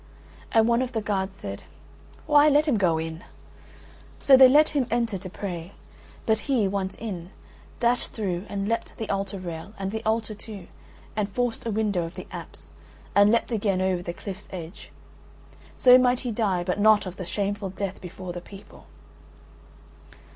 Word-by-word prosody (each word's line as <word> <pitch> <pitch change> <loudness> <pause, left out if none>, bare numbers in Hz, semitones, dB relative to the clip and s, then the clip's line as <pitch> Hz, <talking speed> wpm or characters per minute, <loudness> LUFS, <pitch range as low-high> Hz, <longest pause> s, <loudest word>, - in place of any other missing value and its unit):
And 225 0 +4
one 235 +1 +3
of 260 -1 -3
the 220 - -1
guards 195 -2 -2
said: - - -6 0.6
"Why, 295 -1 +6
let 295 +1 +4
him 265 -7 +3
go 170 -4 +3
in." 160 +1 -5 1.0
So 275 - +7
they 260 -1 +9
let 300 +3 +6
him 275 -5 0
enter 230 -4 0
to 185 - -8
pray. 180 -1 -6 0.5
But 220 -1 +2
he, 240 -7 +3
once 190 -1 -3
in, 185 -6 -6 0.5
dashed 240 0 +1
through 190 -4 -3
and 200 0 -3
leapt 230 +1 -2
the 220 - -4
altar 195 0 -2
rail 180 +3 -7
and 195 0 -3
the 220 +1 -4
altar 220 0 0
too 210 -3 -10 0.5
and 210 -1 -1
forced 240 +2 -2
a - - 0
window 205 -4 0
of 165 +2 -7
the - - -7
apse, - - -10 0.4
and 205 +1 +6
leapt 235 +1 +1
again 200 -4 +1
over 185 -1 +1
the 175 - -4
cliff's 190 +2 -8
edge. 175 -1 -8 0.9
So 250 0 +8
might 250 0 +2
he 245 - -3
die, 200 -5 0
but 180 +3 -2
not 215 0 +5
of 185 0 -7
that 185 - -5
shameful 200 +1 -2
death 190 0 -5
before 185 0 -7
the 175 - -6
people. 195 +2 -14
205 Hz, 175 wpm, -26 LUFS, 185-230 Hz, 1.0 s, they